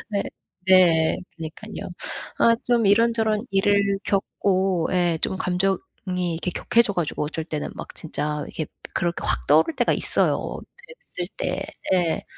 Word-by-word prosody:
네. 200 -1 0 0.4
네. 175 -4 +5 0.2
그니깐요. 165 +6 -7 0.5
아 230 0 +5
좀 235 -3 +2
이런저런 220 +1 +3
일을 200 0 +2
겪고 190 -3 +1
예 175 -2 +2
좀 190 - +1
감정이 185 +1 +1 0.6
이렇게 175 +2 -2
격해져 235 +2 +2
가지고 170 -4 -1
어쩔 160 +1 -4
때는 155 -2 -4
막 - - -8
진짜 150 -2 -3
이게 155 - -4 0.3
그렇게 175 -1 -1
확 - - -1
떠오를 155 - +4
때가 - - +2
있어요 - - 0 0.6
뵀을 - - -2
때. - - -2 0.3
예. 175 -3 +1
185 Hz, 265 characters per minute, -24 LUFS, 165-205 Hz, 0.6 s, 네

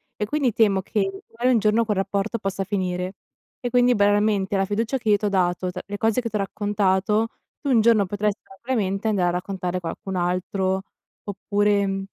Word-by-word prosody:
e 210 - -2
quindi 270 -4 0
temo 200 -4 +3
che 210 - -1 0.3
magari 240 +2 0
un - - +4
giorno 215 +2 +3
quel 210 -3 -1
rapporto 195 +3 -1
possa 195 -2 -3
finire, 185 -1 -2 0.5
e 245 -2 -4
quindi 245 0 +4
banalmente 205 -1 +2
alla 195 0 +2
fiducia 230 +6 -1
che 220 - -2
io 205 - +5
ti 210 - -4
ho - - +2
dato, 180 -1 0
t 180 - -6
le 205 0 -6
cose 225 +3 +1
che 230 - -3
t'ho 215 - -2
raccontato, 205 +1 +1 0.3
tu 285 - -3
un 235 -4 +5
giorno 220 -3 +4
potresti 205 +1 -1
probabilmente 200 -1 -2
andare 195 -5 +2
a - - +1
raccontare 180 0 -3
qualcun 185 +2 -5
altro 185 +2 0 0.4
oppure 205 0 +1
mhmm, 195 0 -2
205 Hz, 190 wpm, -23 LUFS, 190-220 Hz, 0.5 s, io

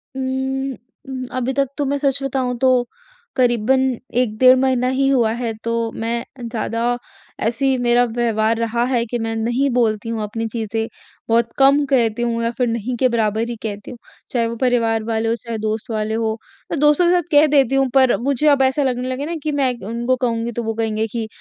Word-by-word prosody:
उम्म, 265 +1 -2 0.4
उम, 260 -1 -4
अभी 255 +1 -1
तक 275 +1 +1
तो 290 - 0
मैं 280 +1 0
सच 280 -1 0
बताऊँ 255 -2 -1
तो 260 -1 +5 0.6
करीबन 250 +1 +2 0.4
1 215 -4 0
डेढ़ 255 +1 +7
महीना 255 -1 +1
ही 270 +1 +2
हुआ 240 -5 +3
है 235 -1 -3
तो 230 0 -1 0.2
मैं 230 +1 -2 0.2
ज़्यादा 230 +1 -1 0.4
ऐसी 260 +4 +1
मेरा 240 0 +4
व्यवहार 225 -1 0
रहा 230 +1 0
है 245 -2 0
कि 240 - 0
मैं 225 0 -2
नहीं 240 +5 0
बोलती 225 -2 +1
हूँ 225 -1 -2
अपनी 225 +2 -3
चीज़ें। 225 0 -3 0.4
बहुत 230 0 +2
कम 275 +2 +5
कहती 240 -4 +2
हूँ 230 -1 0
या 230 - +1
फ़िर 250 -2 +1
नहीं 230 +2 -2
के 255 - +3
बराबर 225 -1 0
ही 240 - -4
कहती 205 0 -5
हूँ। 245 - -9 0.3
चाहे 235 -2 +1
वो 230 - -4
परिवार 230 -3 +2
वाले 225 0 -1
हों 230 - +1
चाहे 230 0 -6
दोस्त 220 +1 -3
वाले 215 0 -1
हों। 225 -1 0 0.4
मैं 315 - -1
दोस्तों 300 +4 +4
के 345 - +4
साथ 355 0 +3
कह 295 +1 +6
देती 275 -3 +3
हूँ 270 -1 +3
पर 260 -2 +5
मुझे 280 +3 +1
अब 285 -2 +5
ऐसा 265 +2 +2
लगने 250 -1 -1
लगे 260 +2 -3
ना 335 +2 -3
कि 310 - -1
मैं 275 -3 +1
उनको 240 +3 0
कहूँगी 235 -2 -1
तो 235 +1 -4
वो 225 0 -2
कहेंगे 220 -1 -1
कि 230 -2 -3
240 Hz, 205 wpm, -20 LUFS, 225-265 Hz, 0.6 s, डेढ़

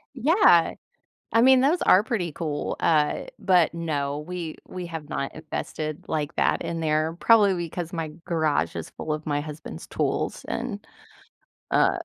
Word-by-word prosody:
Yeah. 270 - +5 0.6
I 230 - +5
mean, 260 0 +7
those 295 +7 +3
are 185 - +6
pretty 185 -8 -2
cool. 150 -2 -3
Uh, 150 -2 +2 0.2
but, 180 -3 +3
no, 145 -4 -2
we 165 +1 -6
we 180 -1 -6
have 160 -3 -7
not 140 - -3
invested 155 0 -5
like 150 0 -2
that - - +2
in 165 -1 -3
there, 155 +1 0
probably 210 -4 +5
because 170 0 -4
my 165 -3 -3 0.2
garage 155 - 0
is 85 - -6
full 155 - -5
of 155 +1 -4
my 145 -1 0
husband's 150 - -8
tools, - - -2
and, - - -4 0.9
uh - - +3
165 Hz, 155 wpm, -25 LUFS, 150-180 Hz, 0.9 s, mean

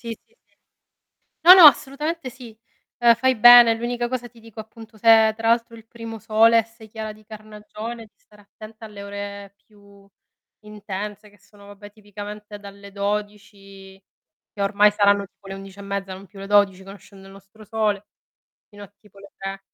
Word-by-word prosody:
Sì, 235 - -10 0.2
sì, 465 - -35
sì. - - -41 0.9
No 360 +2 +9
no 370 -3 +7
assolutamente 295 +2 +3
sì, 240 -3 -14 0.4
uhm, 235 -1 +5
fai 260 +2 0
bene. 240 +1 +8
L'unica 240 +1 -4
cosa 245 -1 -5
ti 235 0 -21
dico 225 -1 -15
appunto 220 0 -13
se 230 - -6 0.2
è - - -4
tra 225 0 -2
l'altro 230 0 0
il 225 -1 -17
primo 225 -1 -10
sole 225 +1 +3
e 225 - -1
sei 225 0 -18
chiara 220 0 -7
di 215 0 -21
carnagione, 215 +2 -10
di 210 - -25
stare 210 0 -23
attenta 215 +2 -14
alle 205 -2 -11
ore 200 0 -9
più 200 -2 -22 0.6
intense 210 0 -8
che 205 - -25
sono 200 +1 -21
vabbè 205 0 -14
tipicamente 210 0 -11
dalle 200 0 -13
12 200 -1 -7 0.5
che 200 - -7
ormai 205 +1 +3
saranno 200 -1 +2
tipo 195 0 -21
le 195 - -7
11 195 0 -13
e - - -8
mezza, 200 -1 -6
non 195 +1 -12
più 200 - -19
le 195 - -8
12 200 -2 +2
conoscendo 195 0 -15
il - - -15
nostro 195 +2 -18
sole, 210 -1 -2 0.6
fino 205 -1 -13
a 205 0 -16
tipo 210 -2 -23
le 200 0 -16
3. 195 0 -7
210 Hz, 185 wpm, -21 LUFS, 200-225 Hz, 0.9 s, No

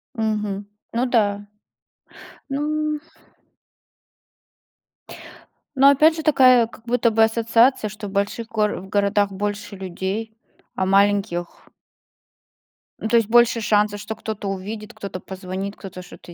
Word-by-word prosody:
Мгм. 210 -3 -2 0.3
Ну 240 +2 +1
да. 205 -5 +1 1.0
Ну. 300 +2 -1 2.8
Но 275 +1 +7
опять 305 +3 +5
же 320 - -5
такая 255 -6 +5
как 225 0 -17
будто 235 -1 +2
бы 225 0 +4
ассоциация, 230 +1 +3
что 215 +1 -8
в 195 - -8
больших 200 +3 -2
гор 215 -2 0
в 190 +1 -10
городах 205 0 +1
больше 205 +1 -4
людей, 195 +4 -4 0.4
а 190 - 0
маленьких 195 -2 +1 1.3
Ну, - - -2
то 235 - +1
есть 225 -2 +1
больше 235 0 +4
шансов, 210 -1 +1
что 215 +1 -6
кто-то 215 -2 -5
увидит, 210 +4 -6
кто-то 200 -4 -7
позвонит, 190 +1 -6
кто-то 190 -2 -9
что-то 180 -1 -13
215 Hz, 125 wpm, -22 LUFS, 200-230 Hz, 2.8 s, Но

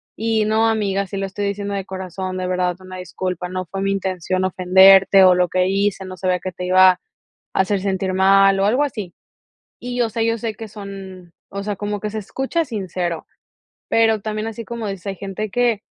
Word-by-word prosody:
Y: 220 -1 0
"No, 220 +1 +2
amiga, 200 -3 0
sí 195 +1 -6
lo 195 - -1
estoy 200 +1 -4
diciendo 200 0 -3
de 195 -1 -3
corazón, 185 0 -5
de 185 - -2
verdad, 180 -1 0
una 185 0 -10
disculpa, 180 0 -4
no 185 0 -4
fue 195 +3 -5
mi 195 0 0
intención 185 -1 -2
ofenderte 190 +1 +6
o 185 -1 +7
lo 180 0 +2
que 185 0 +1
hice, 195 0 0
no 185 0 -8
sabía 180 0 0
que 185 - -5
te 180 +1 -6
iba 185 +1 +7
a 180 - -18 0.6
hacer 190 +1 +1
sentir 190 -1 -1
mal", 195 +1 +5
o 195 - +3
algo 245 +7 +2
así. 210 -11 -4 0.7
Y 245 0 -5
yo 240 -2 +1
sé 225 +1 -1
yo 230 0 +1
sé 225 -1 -3
que 220 +2 -8
son 195 -4 -10 0.2
o 200 0 -5
sea, 205 0 -3
como 205 +1 -3
que 210 - -2
se 220 - -6
escucha 270 - -2
sincero, 185 - -4 0.6
pero 225 -2 +3
también 215 +1 -3
así 225 0 -6
como 230 -2 -5
dices, 195 0 -6
hay 195 - -3
gente 200 +2 -5
que, 240 -2 +1
195 Hz, 210 wpm, -20 LUFS, 185-215 Hz, 0.7 s, o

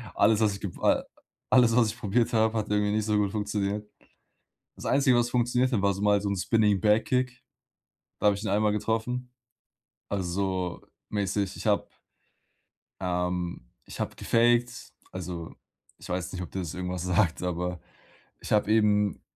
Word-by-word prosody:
alles, 110 -1 +4
was 110 -2 +2
ich 100 - -8
gep 100 - -5
äh, - - +3 0.5
alles, 120 -3 +5
was 120 -2 +4
ich - - -7
probiert 110 +3 +1
habe, 110 0 +2
hat 105 -1 -2
irgendwie 105 0 +1
nicht 110 0 0
so 105 -1 +1
gut 100 -2 +1
funktioniert. 105 0 -2 0.9
Das - - -8
Einzige, 135 -3 +4
was 120 0 +2
funktionierte 120 -2 +1
war 100 0 +3
so 100 - -6
mal 105 0 +4
so 100 - -2
'n 100 - -1
Spinning-Back-Kick, 110 +6 +2 0.8
da - - 0
habe 105 - +5
ich 100 - -7
den 105 - -2
einmal 105 +1 +2
getroffen, 115 +4 -2 0.8
also, 95 -2 -2 0.3
mäßig. 100 -1 -1
Ich - - -8
habe - - +2 1.1
ähm, 90 -6 -2 0.2
ich - - -10
habe - - -3
gefakt, 120 +1 +1 0.2
also, 90 -3 -6 0.4
ich - - -12
weiß 90 0 -2
nicht, 90 - -4
ob 90 - -9
dir 95 - -4
das 85 -4 -4
irgendwas 90 -1 -4
sagt, 90 -1 +1
aber 90 -1 -3 0.6
ich - - -9
habe 105 0 +3
eben 105 -3 +2
105 Hz, 165 wpm, -27 LUFS, 90-110 Hz, 1.1 s, alles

